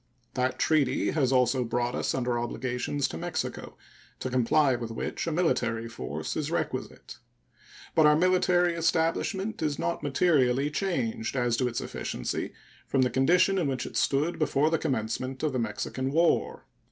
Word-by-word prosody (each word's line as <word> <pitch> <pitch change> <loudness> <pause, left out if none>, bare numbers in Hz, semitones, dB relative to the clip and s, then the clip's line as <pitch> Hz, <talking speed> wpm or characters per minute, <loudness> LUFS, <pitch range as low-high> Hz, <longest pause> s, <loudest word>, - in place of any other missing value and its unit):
That 130 0 0
treaty 155 -4 +2
has 135 -4 +1
also 125 0 +3
brought 120 +1 -1
us - - -1
under 125 -2 0
obligations 125 +3 -2
to 80 - -6
Mexico, - - -4 0.4
to 130 - -4
comply 130 +2 +3
with 120 -2 -5
which 115 +7 -4
a - - 0
military 120 -9 0
force 90 - -5
is - - -2
requisite. - - -4 0.7
But 155 -2 +5
our 150 - +6
military 180 0 +3
establishment 170 +6 0
is 150 -2 0
not 85 - -2
materially 140 -2 +2
changed 220 +5 -2
as 120 -2 +1
to 125 - +1
its 120 - -3
efficiency - - -4 0.4
from 135 -1 +2
the 125 - +1
condition 180 +8 +3
in 165 - 0
which 130 -2 -2
it - - -8
stood 150 +6 +1
before 150 0 +2
the 165 - +2
commencement 130 0 -2
of 155 -3 0
the 130 - 0
Mexican 120 +4 -3
War. 165 +3 +1
135 Hz, 160 wpm, -28 LUFS, 125-165 Hz, 0.7 s, our